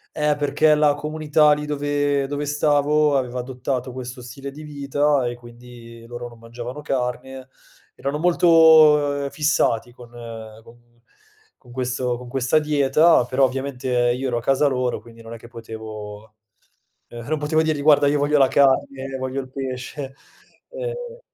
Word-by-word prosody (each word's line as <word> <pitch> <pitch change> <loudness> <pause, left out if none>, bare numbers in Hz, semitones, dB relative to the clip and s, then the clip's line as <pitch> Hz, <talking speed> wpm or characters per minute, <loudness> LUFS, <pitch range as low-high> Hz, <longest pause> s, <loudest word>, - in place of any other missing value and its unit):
Eh, 150 -1 +1
perché 145 +1 +2
la 150 -1 +3
comunità 150 0 +2
lì 150 0 -1
dove 145 -1 -1
dove 145 +1 -4
stavo 145 0 +2
aveva 125 -2 -2
adottato 125 0 -4
questo 125 0 -8
stile 135 +3 -8
di 150 +3 -11
vita 145 -1 0
e 120 - -4
quindi 120 -1 -14
loro 120 0 -7
non 120 - -15
mangiavano 120 +4 -8
carne, 130 0 -4 0.5
erano 140 +2 -3
molto, 175 +1 +2 0.8
uhm, - - -6
fissati 120 -6 0
con 120 -1 -15 0.5
con 120 0 -21 0.6
con 125 - -20
questo 125 0 -2
con 125 - -11
questa 130 +3 +1
dieta, 150 0 +3
però 130 +2 +2
ovviamente 130 0 -3 0.2
io 130 +2 -2
ero 120 -1 -1
a - - -4
casa 135 +3 +2
loro 125 -3 -1
quindi 115 +1 -15
non 115 0 -11
è - - -7
che 115 - -14
potevo, 110 -2 -9 0.7
ehm, 120 0 -9
non 155 0 0
potevo 155 +2 +1
dirgli: 155 -2 -1
“Guarda, 145 -1 +5
io 145 +1 +1
voglio 145 +1 +2
la 135 -1 +5
carne, 135 -1 +1
voglio 130 +1 -3
il 130 - -12
pesce”, 135 +1 -6 0.6
ehm - - -6
135 Hz, 155 wpm, -22 LUFS, 125-150 Hz, 0.8 s, Guarda